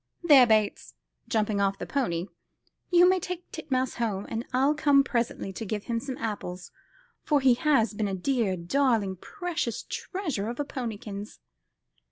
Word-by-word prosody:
There, 280 -7 +7
Bates," 215 -2 +1 0.3
jumping 215 -2 0
off 195 0 +1
the - - -5
pony, 175 -12 -1 0.6
"you 355 0 +6
may 370 0 +4
take 360 0 -6
Titmouse 260 -5 -2
home, 210 -4 -1
and 225 +1 -3
I'll 265 +3 +3
come 285 -2 +4
presently 235 -6 -2
and 195 +2 -6
give 210 -1 -2
him 230 -2 -2
some 260 +1 -6
apples, 185 -5 -5 0.5
for 295 -2 +3
he 265 -2 +5
has 240 -4 +2
been 210 0 -1
a 195 - -2
dear, 210 -2 0
darling, 210 0 +1
precious 350 - -4
treasure 310 - -4
of 240 - -6
a 290 - 0
ponykins." 215 -6 -6
235 Hz, 160 wpm, -27 LUFS, 205-280 Hz, 0.6 s, There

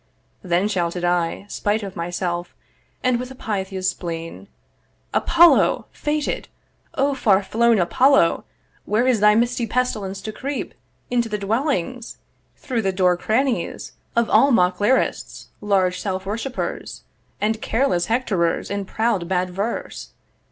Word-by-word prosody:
Then 180 +2 +1
shouted 175 -3 -1
I 175 +1 0
Spite 205 +1 -1
of 195 -2 -7
myself, 175 0 -3 0.5
and 255 -1 +2
with 250 0 -5
a 265 - -10
Pythia's 190 -5 -2
spleen, 165 - -7 0.7
'Apollo! 340 0 +4
faded! 300 -1 -2 0.5
O 280 -1 +2
far 205 -7 +3
flown 235 +3 +3
Apollo! 225 +2 +3 0.4
'Where 215 +4 +1
is 255 -4 +3
thy 210 +1 +5
misty 240 +1 +1
pestilence 210 -5 -1
to 215 - -4
creep 275 +5 -5 0.4
'Into 240 -2 +1
the 210 - -2
dwellings, 235 - -2 0.4
through 250 -4 -2
the 195 -2 0
door 185 -1 +3
crannies 230 +7 -1 0.2
'Of 235 -1 +2
all 275 - +5
mock 180 -7 +3
lyrists, 245 +6 0
large 190 -3 +1
self 190 -1 -3
worshipers, 230 +6 -4 0.4
'And 220 +1 0
careless 225 -8 +1
Hectorers 205 -10 0
in 200 -1 -2
proud 215 -4 -1
bad 180 0 0
verse. 200 +6 -4
210 Hz, 130 wpm, -22 LUFS, 185-245 Hz, 0.7 s, thy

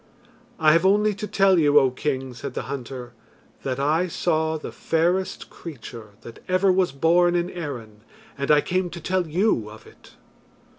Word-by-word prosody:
"I 155 -1 +5
have 165 +2 +4
only 210 +2 +3
to 210 +2 -6
tell 195 -3 +3
you, 145 -2 +4
O 135 -2 +2
king," 130 -1 -3
said 125 +3 -7
the - - -3
hunter, 125 -2 -7 0.5
"that 130 -1 -3
I 155 +6 +1
saw 160 -2 0
the 155 - -7
fairest 175 +4 -1
creature 115 -9 -10
that 115 0 -11
ever 185 +1 +3
was 185 -1 +2
born 175 +5 +3
in 175 +1 -1
Erin, 120 -11 -7 0.3
and 140 0 -4
I 150 -1 +6
came 185 +2 -1
to 170 0 -8
tell 180 +1 -1
you 160 - +1
of 110 +1 -13
it." - - -18
160 Hz, 170 wpm, -24 LUFS, 135-180 Hz, 0.5 s, I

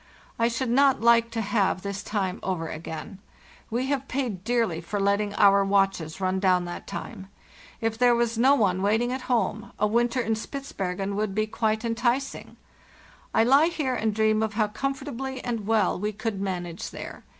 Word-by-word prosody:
I 230 - +4
should 235 +1 -1
not 270 -2 +4
like 230 0 +5
to 230 -1 -3
have 200 -3 0
this 200 0 -4
time 195 -3 -2
over 180 -4 -2
again. 160 +3 -7 0.5
We 240 +3 -1
have 275 -1 -1
paid 240 -9 -3
dearly 225 -7 0
for 205 +5 -3
letting 200 +1 +1
our 200 0 +5
watches 195 -4 +1
run 190 0 0
down 185 -2 +3
that 175 - -7
time. 195 -4 -7 0.5
If 225 0 -1
there 245 -1 +5
was 235 -1 0
no 260 +5 +5
one 190 -7 +1
waiting 220 +5 +1
at 260 +1 -3
home, 220 -2 0
a - - +2
winter 235 +3 +1
in 225 -2 0
Spitzbergen 200 -6 -4
would 210 -1 -2
be 215 0 +1
quite 220 +1 -1
enticing. 240 +4 -1 0.7
I 225 - +4
lie 275 +7 +5
here 300 -6 -1
and 220 -2 0
dream 215 0 +2
of 215 -1 -2
how 215 -1 +1
comfortably 270 +1 -4
and 230 -4 -3
well 215 -5 +2
we 210 +2 -2
could 210 -1 -3
manage 180 -3 -4
there. - - -8
220 Hz, 180 wpm, -26 LUFS, 195-240 Hz, 0.7 s, like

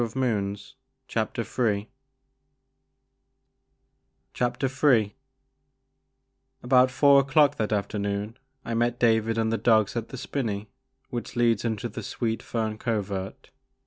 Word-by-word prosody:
Poor 120 - +1
Howlett 110 -1 -2 0.8
1 105 -3 +1 2.5
Ill 125 - +1 2.2
ABOUT 125 +1 +5
four 140 +2 +5
o'clock 140 +1 +3
that 110 -1 -1
afternoon 100 +1 -2 0.3
I 115 - -3
met 120 +1 +1
David 115 -1 +2
and 110 0 +1
the 115 - 0
dogs 110 -4 +3
at 115 -1 -3
the 130 - -7
spinney 110 -6 -3 0.4
which 120 +1 -5
leads 115 -3 +2
into 115 -1 -2
the 110 - -7
Sweet 115 -2 -3
Fern 110 -2 -3
Covert. 105 +3 -4
115 Hz, 110 wpm, -26 LUFS, 105-125 Hz, 2.5 s, ABOUT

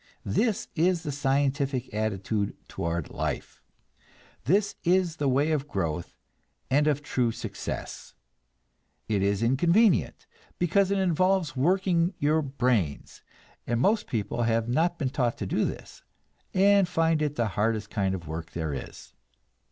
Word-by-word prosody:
This 210 - 0
is 170 +1 +2
the 150 - -3
scientific 135 -2 0
attitude 105 -1 -1
toward 85 -1 -3
life; - - -4 0.8
this 200 +8 +2
is 175 -2 +2
the 145 -2 +1
way 140 +5 +2
of 150 -2 -1
growth 85 - -3 0.5
and 145 +3 +3
of 150 -1 +1
true 125 -5 0
success. - - -6 0.9
It 105 -3 0
is 100 +2 +1
inconvenient, 170 - +3 0.3
because 185 +3 +2
it 200 - +1
involves 185 -3 +1
working 175 +4 +2
your 155 +2 +2
brains, 125 - -1 0.5
and 120 0 0
most 210 - +2
people 110 +1 -2
have 115 -1 +1
not 165 +8 +1
been 135 -4 -1
taught 125 -4 0
to - - -4
do - - 0
this, - - -7 0.5
and 200 0 +4
find 165 -2 +1
it 150 -1 -1
the 115 -4 0
hardest 105 +2 -1
kind 95 -3 0
of 85 -4 -8
work 80 +2 -6
there 80 -3 -3
is. 65 - -8
140 Hz, 140 wpm, -27 LUFS, 110-170 Hz, 0.9 s, and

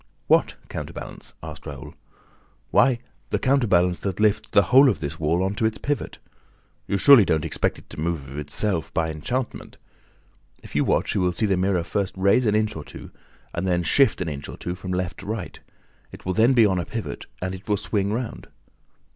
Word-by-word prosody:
"What - - +3
counterbalance?" - - -7
asked - - -9
Raoul. 70 -3 -8 0.8
"Why, 120 +5 +4 0.3
the - - +1
counterbalance 100 -10 +2
that 95 -1 -3
lifts 110 0 +2
the 100 - +5
whole 135 +1 +8
of 100 -10 -1
this 75 +3 -5
wall 80 +4 +1
on 95 +1 0
to 110 - -1
its 110 - -3
pivot. 145 0 -3 0.7
You 100 - 0
surely 135 +2 +8
don't 80 -5 0
expect - - -1
it - - -16
to - - -8
move 80 -3 -2
of 70 +2 -6
itself, 85 +3 -2
by 80 -1 +1
enchantment! 120 - -4 0.9
If - - -12
you - - +3
watch, - - +1
you 100 - +1
will 90 -1 +1
see 95 - 0
the 100 -2 +2
mirror 90 -1 +1
first 95 +2 -2
rise 100 +6 +3
an 105 - +2
inch 110 0 +1
or 80 - -6
two - - -11 0.4
and 85 +2 -2
then 90 -1 +1
shift 110 - +3
an 90 - -2
inch 70 -2 -5
or - - -8
two 90 - -4
from 95 0 -7
left 90 0 -2
to - - -9
right. 105 -7 -5 0.5
It - - -12
will 95 - 0
then 115 +6 +4
be 115 -3 +6
on 95 -3 +2
a 85 - -3
pivot 115 -2 -6
and 95 0 -4
will 105 -1 +2
swing 100 +1 -1
round." 115 +1 -4
95 Hz, 205 wpm, -24 LUFS, 85-110 Hz, 0.9 s, whole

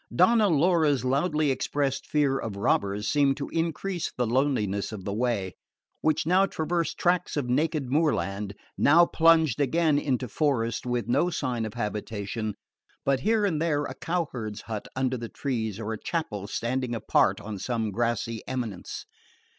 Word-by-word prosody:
Donna 210 +3 +5
Laura's 155 -4 +3
loudly 150 +2 +1
expressed 135 +1 -1
fear 140 -3 +2
of 110 -3 -4
robbers 100 +1 0
seemed 140 -1 +3
to 140 - -4
increase 170 +2 -2
the 125 - -1
loneliness 115 -6 0
of 105 -4 -7
the 100 - -2
way, 105 -5 -1 0.5
which 155 -2 +1
now 185 +4 +4
traversed 165 -2 -1
tracts 175 -2 +1
of 145 - 0
naked 150 +2 0
moorland, 105 -10 0 0.2
now 170 +4 +6
plunged 160 -5 +4
again 155 +1 +2
into 130 -3 -1
forest, 125 -4 0
with 120 -1 -1
no 170 +8 +2
sign 125 -8 -2
of 105 - -10
habitation 105 0 -3 0.5
but 135 -1 +2
here 215 +5 +2
and 160 -6 0
there 150 -3 +1
a - - -4
cowherd's 130 - -3
hut 110 -2 -6
under 130 -1 0
the 115 -1 -6
trees 115 -7 -3
or 110 0 -3
a 110 - -6
chapel 105 - -3
standing 120 +3 -2
apart 115 - +2
on 105 -2 -6
some 115 -1 -2
grassy 115 +1 -1
eminence. 120 -8 -4
130 Hz, 155 wpm, -27 LUFS, 110-155 Hz, 0.5 s, now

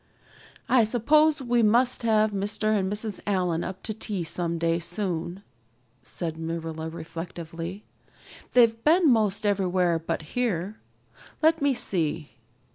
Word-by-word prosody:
"I 250 -2 +5
suppose 290 +7 +3
we 240 -1 +2
must 240 +4 +3
have 215 -2 +3
Mr. 205 +2 0
and 190 -2 0
Mrs. 210 0 -3
Allan 180 -4 0
up 190 0 -6
to 215 - -3
tea 205 -4 -4
someday 165 0 -1
soon," 175 0 -4 0.6
said 160 +5 -5
Marilla 160 -1 -4
reflectively. 170 +3 -7 0.7
"They've 230 -2 +4
been 325 -1 +5
most 215 -2 +1
everywhere 185 -4 +1
but 160 -1 -3
here. 215 -4 -1 0.6
Let 325 0 +4
me 280 -2 +2
see. 165 -8 -2
200 Hz, 120 wpm, -26 LUFS, 170-230 Hz, 0.7 s, I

